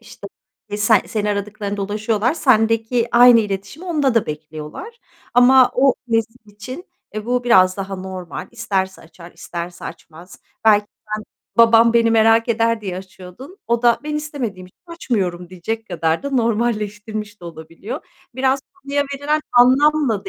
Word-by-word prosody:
işte, - - -12 0.5
se 210 0 +4
seni 210 +1 -2
aradıklarında 205 0 -4
ulaşıyorlar, 215 +5 -1
sendeki 230 -3 +2
aynı 240 -1 +7
iletişimi 205 - -5
onda 290 -7 +1
da 230 - +2
bekliyorlar 155 - -8 0.4
ama 255 +1 +6
o 265 +1 +4
nesil 225 0 0
için, 210 - -9 0.3
eee, 215 0 -5
bu 245 0 0
biraz 185 -6 +4
daha 195 -1 -5
normal. 185 -2 -7
İsterse 195 -5 -3
açar, 170 +1 -15
isterse 175 0 -7
açmaz. 170 +3 -11 0.3
Belki 210 -1 +4 0.3
sen, 215 - -9 0.3
"Babam 230 0 +6
beni 230 -1 +3
merak 225 +1 +4
eder." 230 0 +1
diye 190 -3 -5
açıyordun, 190 - -12
o 235 +1 0
da 235 -1 +4
"Ben 300 0 -4
istemediğim 255 -11 -5
için 180 - -24
açmıyorum." 190 - -3
diyecek 220 +5 -5
kadar 165 - -1
da 280 - -4
normalleştirmiş 215 -3 -2
de 175 - -12
olabiliyor. 165 - -8 0.3
Biraz 265 +1 +1
konuya 285 -5 -2
verilen 295 +2 -1
anlamla 255 -2 +4
da - - -6
225 Hz, 145 wpm, -19 LUFS, 190-245 Hz, 0.5 s, aynı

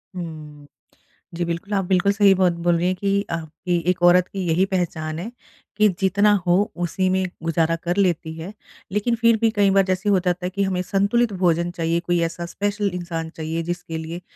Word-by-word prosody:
हुँ। 155 -4 -8 0.7
जी, 170 0 -2
बिल्कुल। 170 +5 -4
आप 195 -2 +1
बिल्कुल 190 +2 +2
सही 200 -1 +5
बात 185 -1 +3
बोल 175 -1 +4
रही 175 +2 0
हैं 185 - 0
कि 200 +1 0
आपकी 170 +2 -3
एक 180 -1 0
औरत 180 +1 +5
की 195 - -7
यही 175 +4 +3
पहचान 160 -3 -2
है 220 +7 -6 0.5
कि 215 0 +5
जितना 200 +2 +3
हो 175 0 +4 0.3
उसी 185 +2 0
में 190 0 +1 0.2
गुज़ारा 165 0 +1
कर 175 +3 -1
लेती 170 -4 +1
है। 180 +6 -7 0.4
लेकिन 210 +4 0
फिर 230 -1 +3
भी 225 - +4
कई 205 -2 +3
बार 195 - +6
जैसे 185 +2 -1
हो 195 -2 +4
जाता 180 0 -1
है - - -1
कि 200 +1 -1
हमें 185 -2 -1
संतुलित 205 +4 +1
भोजन 175 -2 +1
चाहिए, 165 0 -1
कोई 175 0 0
ऐसा 170 +1 -3
स्पेशल 205 +3 -2
इंसान 170 -2 -4
चाहिए, 165 +1 -3
जिसके 175 -1 -5
लिए 165 +2 -6
180 Hz, 200 wpm, -22 LUFS, 170-200 Hz, 0.7 s, बार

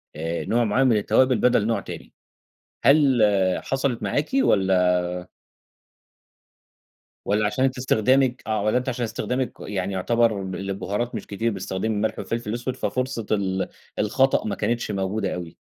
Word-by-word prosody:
آآ، 80 +2 -3
نوع 120 +1 +2
معيّن 125 +5 +2
من 115 - +4
التوابل 130 +4 +3
بدَل 120 -4 +3
نوع 115 -3 +1
تاني، - - -9 0.7
هل 140 -4 +5 0.4
حصلِت 135 -3 -1
معاكِ 145 +1 -1
والَّا 95 - +3 2.3
والَّا 105 +1 +1
عشان 120 +5 0
أنتِ 135 0 -1
استخدامِك 130 +1 +2
آه، 110 -1 0
والَّا 105 +3 +2
أنتِ 125 +1 -1
عشان 125 -1 -2
استخدامِك 125 +2 -2
يعني 95 -1 -3
يُعتبر 110 +2 +1
الب 95 -1 -5
البُهارات 100 +4 -3
مش - - -6
كتير 115 +3 -1
بتستخدمي 95 +1 -3
الملح 105 +2 -1
و - - -2
الفلفل 115 -2 -4
الأسود، 120 +3 -3
ففرصة 130 -3 -2
ال 95 -2 0 0.3
الخطأ 135 +6 +2
ما 105 - -2
كانتش 115 +1 -1
موجودة 100 0 -2
أوي؟ 85 -2 -7
110 Hz, 150 wpm, -24 LUFS, 100-125 Hz, 2.3 s, هل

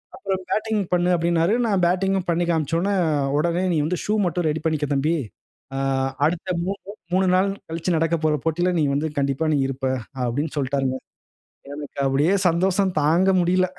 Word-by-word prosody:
அப்புறம் 195 -5 -3
பேட்டிங் 215 -1 0
பண்ணு 175 0 +2
அப்பிடினாரு. 170 +2 +1
நான் 195 -4 +1
பேட்டிங்கும் 190 +1 +1
பண்ணி 170 +1 +1
காண்பிச்சவுன்னே, 165 +5 0 0.4
உடனே 170 +3 +1
"நீ - - +1
வந்து 180 +2 -1
ஷூ 210 - 0
மட்டும் 175 -1 0
ரெடி 155 +1 -2
பண்ணிக்க 155 -2 0
தம்பி. 150 +5 +1 0.6
ஆ, - - -1 0.5
அடுத்த 175 +4 -1 0.2
மூன்று 195 +1 -5 0.2
3 190 +1 +3
நாள் 195 +2 +3 0.2
கழிச்சு 165 +2 -1
நடக்கப்போற 155 -1 +1
போட்டியில 175 +3 +1
நீ - - +2
வந்து 145 +3 0
கண்டிப்பா 140 +2 0
நீ - - +2
இருப்ப" 135 0 -4 0.4
அப்பிடின்னு 145 +6 -2
சொல்டாருங்க. 135 -1 0 0.8
எனக்கு 145 -1 -8
அப்பிடியே 145 +8 +2
சந்தோஷம் 185 +2 +1
தாங்க 170 +6 +3
முடியல. 185 +1 +2
170 Hz, 155 wpm, -23 LUFS, 150-185 Hz, 0.8 s, 3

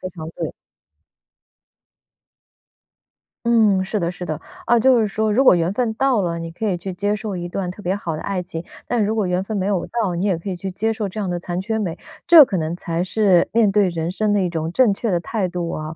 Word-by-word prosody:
非 185 - -4
常 165 -3 -8
对 - - -4
的。 - - -8 2.9
嗯， 215 -5 +4
是 205 +3 -2
的 170 -1 -1
是 180 0 -7
的， 155 -3 -3 0.3
啊， 240 - +4
就 255 0 +5
是 215 - +1
说 215 +1 0
如 260 +5 +4
果 185 - +6
缘 170 +2 0
分 225 -1 -1
到 260 -2 +2
了， 170 -2 -1
你 165 0 -6
可 215 +6 -4
以 185 - 0
去 185 +2 -6
接 205 +3 -1
受 210 -1 -5
一 175 -1 -4
段 180 0 -3
特 195 - -10
别 190 +1 -1
好 170 -5 -4
的 155 - -5
爱 190 -2 -2
情， 170 -2 -6 0.2
但 240 -2 0
如 210 +2 0
果 215 -3 0
缘 180 +1 0
分 215 +1 -4
没 185 - -1
有 195 -4 0
到， 215 -7 -1
你 175 +4 -1
也 190 -4 +2
可 170 +4 -6
以 185 - -2
去 190 +2 -5
接 220 +4 -1
受 215 -2 -3
这 215 - -8
样 200 -3 -2
的 175 - -2
残 175 0 -4
缺 220 +4 -2
美， 180 -5 -3 0.3
这 330 -4 +10
可 190 -7 -2
能 160 +2 -2
才 170 -1 -2
是 190 -2 +3
面 215 -4 +4
对 205 -2 +3
人 165 -1 -3
生 210 +3 0
的 200 - +2
一 180 - -1
种 160 -1 -3
正 235 +1 +4
确 220 +2 -2
的 175 - +2
态 190 +1 -2
度 175 -1 -3
啊。 155 0 -5
190 Hz, 270 characters per minute, -21 LUFS, 175-215 Hz, 2.9 s, 这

